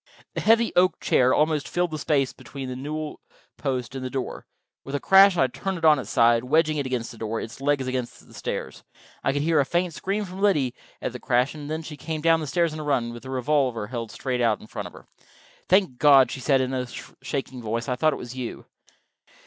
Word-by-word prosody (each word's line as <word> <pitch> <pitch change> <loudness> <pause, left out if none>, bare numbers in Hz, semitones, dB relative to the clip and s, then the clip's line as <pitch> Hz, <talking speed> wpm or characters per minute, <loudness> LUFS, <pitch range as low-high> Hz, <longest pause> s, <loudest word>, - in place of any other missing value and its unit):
The - - -3
heavy 225 +1 +4
oak 180 +1 +3
chair 130 0 +3
almost 150 0 +2
filled 175 -1 -1
the 155 - -4
space 140 -3 +1
between 135 -2 -8
the 125 - -4
newel 150 +3 -5 0.4
post 130 -3 -2
and 135 -1 -5
the 130 - -3
door. 130 0 -5 0.4
With 135 - -5
a - - 0
crash 195 +1 +6
I - - +3
had 130 -2 +1
turned 195 -2 -3
it 165 - -2
on 155 -3 +6
its 110 -5 -7
side, 115 +1 +4
wedging 155 +3 +2
it 140 -2 -1
against 125 -3 -3
the 115 - -13
door, 110 0 -2
its 115 +4 -8
legs 140 -1 +1
against 130 -1 -4
the - - -17
stairs. - - -5 0.4
I - - +2
could 145 +1 -1
hear 160 -1 +3
a - - +5
faint 175 +4 -1
scream 200 +5 -2
from 185 +1 -8
Liddy, 150 -12 +2 0.3
at - - -1
the 125 - -8
crash, 125 +2 +1
and 150 -2 -8
then 160 +1 -3
she 155 -2 -8
came 155 0 -4
down 165 0 +4
the 155 - -4
stairs 165 +3 +1
on 155 - -6
a - - -4
run, 125 -5 0
with 120 - -9
the 130 - -10
revolver 130 -3 0
held 115 0 -5
straight 125 +1 -3
out 115 -3 +2
in - - -13
front - - -6
of - - -14
her. - - -14 0.6
"Thank 185 -9 +3
God," 140 -3 +6
she - - -5
said, 135 0 +2
in 130 0 -2
a 125 -1 -2 0.3
shaking 130 -3 -4
voice. 115 +1 -3
"I 125 - 0
thought 155 +5 +2
it - - -3
was 125 +1 -8
you." 125 -2 -6
135 Hz, 245 wpm, -25 LUFS, 125-155 Hz, 0.6 s, crash